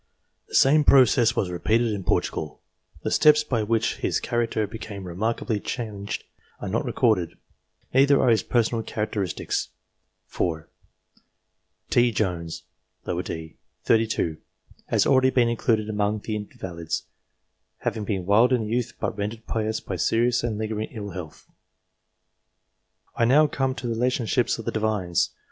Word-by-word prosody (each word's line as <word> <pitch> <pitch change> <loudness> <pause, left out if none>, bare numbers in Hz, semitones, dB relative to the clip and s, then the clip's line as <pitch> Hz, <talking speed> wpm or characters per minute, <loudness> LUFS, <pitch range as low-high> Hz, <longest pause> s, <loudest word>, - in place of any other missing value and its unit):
The - - -7
same 150 +3 +5
process 125 -4 +5
was 95 -6 0
repeated 110 +5 +1
in 100 -2 -4
Portugal. 75 -3 -1 0.4
The - - -2
steps 150 0 +5
by 120 -6 -1
which 110 +1 0
his - - 0
character 115 -2 -1
became 105 -1 -8
remarkably 105 +5 -2
changed 105 -3 -5 0.4
are - - -5
not - - -1
recorded, 100 -8 +1 0.6
neither 140 +2 +5
are 125 - +3
his 110 - +3
personal 115 -1 +1
characteristics. 105 -4 -2 0.6
[4.] 80 -2 -2 1.2
T. 120 0 +4
Jones, 90 -6 -2 0.4
d. 80 -1 -4 0.3
set. 115 - +5
32, 110 -8 -1 0.5
has - - +2
already 130 -1 +4
been 125 -2 +3
included 110 -2 +1
among 105 0 0
the 110 - -3
invalids, 90 -5 -5 0.8
having 110 - -2
been 95 -3 -2
wild 110 +6 +4
in 120 -4 +2
youth 120 +2 -1
but - - -2
rendered 105 +2 -4
pious 110 0 -1
by 95 - -5
serious 115 +5 +2
and 115 -3 -2
lingering 110 0 -3
ill 105 -4 -6
health. 85 -4 -9 1.7
I 115 - +2
now 145 +6 +6
come 135 -3 -1
to - - -7
the 115 - -1
relationships 120 0 +1
of 115 - -8
the - - -1
Divines. 105 -6 0
110 Hz, 140 wpm, -25 LUFS, 100-120 Hz, 1.7 s, now